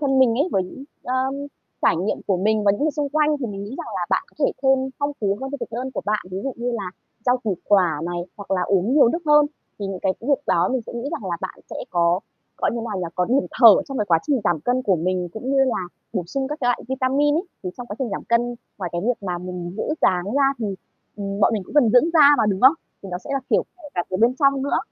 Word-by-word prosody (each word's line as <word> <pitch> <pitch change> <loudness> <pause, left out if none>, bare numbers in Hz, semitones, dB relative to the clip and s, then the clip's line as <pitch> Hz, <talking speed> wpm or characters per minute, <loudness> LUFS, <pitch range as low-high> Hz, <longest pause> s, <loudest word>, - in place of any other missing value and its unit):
thân 270 -2 +2
mình 250 -3 +5
ấy, 290 +9 +1
bởi 190 - +2 0.4
ờm, 260 +2 -1 0.5
trải 165 - +4
nghiệm 190 +5 -1
của 195 -3 +2
mình 215 +3 +1
và 200 - +5
những 205 - -3
người 310 - +3
xung 295 -1 -2
quanh, 300 +1 +2
thì 245 - -1
mình 200 -1 -5
nghĩ 205 - -8
rằng - - -6
là - - -2
bạn - - +2
có - - -27
thể - - +2
thêm 270 0 +4 0.2
phong 285 0 -1
phú 200 -1 0
hơn 270 0 -4
cho 285 - -3
thực - - -5
đơn 255 +3 -3
của - - -4
bạn. 210 0 0
Ví 185 - -4
dụ 270 - -2
như 240 +1 -2
là 200 -6 -3 0.4
rau 250 +1 +4
củ 210 -6 -2
quả 180 -7 +3
này, 175 0 -3 0.2
hoặc 200 - -10
là 185 -2 +1
uống 195 +7 +1
nhiều 280 -6 +6
nước 335 - 0
hơn, 295 0 +6 0.3
thì 200 - -3
những 190 -2 -5
cái 190 - +2
việc 275 +4 +1
đó - - +3
mình 255 - 0
sẽ - - -7
nghĩ 235 +4 -4
rằng 195 - -4
là 170 - -1
bạn - - -6
sẽ - - -5
có 175 +1 +2 0.4
gọi - - +1
như 235 - -2
nào 205 - -3
nhỉ? 185 - -2
Có 180 - +1
điểm 265 +6 +1
thở 225 -4 +10
trong 270 - -4
cái 210 - +1
quá 170 -4 +4
trình 280 -4 +2
giảm 165 -4 +1
cân 250 +5 0
của 195 -6 +2
mình 180 +2 -1
cũng 250 +5 -4
như 275 - +3
là 255 -7 0 0.3
bổ 185 -6 -2
sung 265 +8 -2
các 300 +1 -5
cái 245 - +1
loại 245 - +1
vitamin 270 +2 +2
ấy. 335 +5 0 0.2
Thì 180 - -3
trong 245 - -7
quá 205 - -7
trình 260 -3 -1
giảm - - -4
cân, 240 +1 +1 0.2
ngoài 180 -3 -3
cái 175 - -1
việc 245 -4 0
mà 180 -2 -2
mình 180 -1 -6
giữ - - -2 0.2
dáng 180 -1 +3
ra 270 +7 +2
thì, 220 - -2 0.5
ừm, 200 0 -4
bọn 210 - +4
mình 210 - -1
cũng - - -13
cần 270 -7 +5
dưỡng 255 +9 +5
da 305 -4 +8
mà, - - +4
đúng 195 -2 -1
không? 265 +4 +7 0.3
Thì 195 - -8
đó 180 - -2
sẽ 275 - -10
là 275 - 0
kiểu - - +4
kể 310 -5 -12
cả 175 - +1
từ 185 - 0
bên 235 +5 +3
trong 275 -2 +3
nữa. 280 - +1
230 Hz, 285 wpm, -22 LUFS, 190-270 Hz, 0.5 s, thở